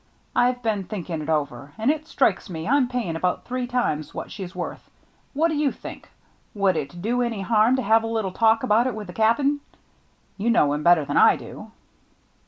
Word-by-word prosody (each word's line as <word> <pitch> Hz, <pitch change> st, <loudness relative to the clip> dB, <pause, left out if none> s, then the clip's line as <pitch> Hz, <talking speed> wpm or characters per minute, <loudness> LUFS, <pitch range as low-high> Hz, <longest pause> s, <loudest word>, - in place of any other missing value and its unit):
I've 245 Hz, 0 st, +2 dB
been 210 Hz, -4 st, -1 dB
thinking 175 Hz, -5 st, -5 dB
it 150 Hz, -, -6 dB
over, 145 Hz, -3 st, -2 dB
and 225 Hz, +6 st, +2 dB
it 310 Hz, 0 st, -4 dB
strikes -, -, +1 dB
me 165 Hz, -2 st, -5 dB
I'm 270 Hz, 0 st, +3 dB
paying 240 Hz, -10 st, -3 dB
about 180 Hz, +2 st, -1 dB
three 250 Hz, 0 st, -3 dB
times 235 Hz, -, -2 dB
what -, -, -6 dB
she's 190 Hz, -2 st, -7 dB
worth. 180 Hz, -, -6 dB, 0.5 s
What 320 Hz, +4 st, +2 dB
do -, -, -1 dB
you 295 Hz, -2 st, +1 dB
think? -, -, -10 dB, 0.5 s
Would 195 Hz, -3 st, +2 dB
it 155 Hz, +3 st, -5 dB
do 245 Hz, +3 st, 0 dB
any 235 Hz, -4 st, -2 dB
harm 220 Hz, +4 st, +3 dB
to 260 Hz, -, -1 dB
have 225 Hz, +2 st, +4 dB
a 225 Hz, -, -4 dB
little 220 Hz, -4 st, -2 dB
talk 225 Hz, +3 st, +3 dB
about 235 Hz, 0 st, +3 dB
it 255 Hz, -, -3 dB
with 215 Hz, -1 st, -6 dB
the 180 Hz, -, -10 dB
Cap'n? 275 Hz, +8 st, +2 dB, 0.8 s
You 215 Hz, +4 st, 0 dB
know 150 Hz, -11 st, +3 dB
him 150 Hz, -, -2 dB
better 170 Hz, -2 st, +4 dB
than -, -, -1 dB
I -, -, +7 dB
do." -, -, -10 dB
220 Hz, 205 wpm, -24 LUFS, 175-245 Hz, 0.8 s, I